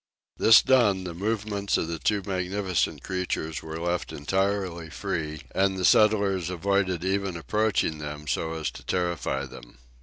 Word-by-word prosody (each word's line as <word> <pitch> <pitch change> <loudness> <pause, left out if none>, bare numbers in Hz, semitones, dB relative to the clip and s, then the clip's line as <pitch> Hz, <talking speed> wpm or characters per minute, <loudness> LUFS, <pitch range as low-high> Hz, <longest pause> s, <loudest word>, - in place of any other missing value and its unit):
This 110 0 +7
done, 105 -8 +3
the 90 -2 -5
movements 100 +1 -1
of - - -1
the 85 -1 -4
two 105 -2 0
magnificent 95 -4 -1
creatures 80 -4 -3
were 80 0 -6
left 85 +1 -2
entirely 95 +1 -1
free, 75 -2 -4
and 95 0 +1
the 90 - 0
settlers 100 -5 +4
avoided 95 -1 0
even 95 -2 -1
approaching 100 -3 0
them 75 0 -6
so 80 +3 -1
as 75 -4 -3
to - - -12
terrify 85 -7 -1
them. - - -13
90 Hz, 150 wpm, -26 LUFS, 80-100 Hz, -, This